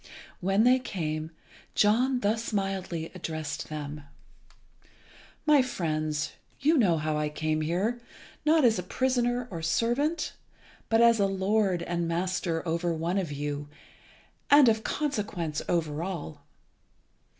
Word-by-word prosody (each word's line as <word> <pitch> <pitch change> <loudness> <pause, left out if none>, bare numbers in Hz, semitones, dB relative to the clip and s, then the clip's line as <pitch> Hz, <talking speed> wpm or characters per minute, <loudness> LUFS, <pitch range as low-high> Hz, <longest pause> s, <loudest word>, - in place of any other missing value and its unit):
When 195 +4 +2
they 255 +2 +5
came, 155 -9 -3 0.5
John 245 +5 +3
thus 220 +3 0
mildly 190 -5 -2
addressed 160 -4 -5
them 150 -1 -5 1.4
"My 300 -3 +6
friends, 155 -10 -2 0.3
you 305 +4 +3
know 195 - +4
how 155 0 -1
I 150 0 0
came 155 +1 -1
here, 195 +10 -1 0.4
not 310 -2 +4
as 225 -5 +4
a - - -1
prisoner 245 +4 0
or 165 -2 -5
servant, 240 - 0 0.6
but 225 0 +4
as 235 -1 +6
a 200 - +4
lord 195 -2 +1
and 170 -1 -2
master 170 -1 -1
over 170 +1 0
one 170 +4 -1
of 175 -6 -3
you, 145 0 -4 0.8
and 285 -2 +8
of 220 -1 +3
consequence 205 - -2
over 160 -3 0
all. 165 -5 -5
185 Hz, 130 wpm, -28 LUFS, 160-230 Hz, 1.4 s, and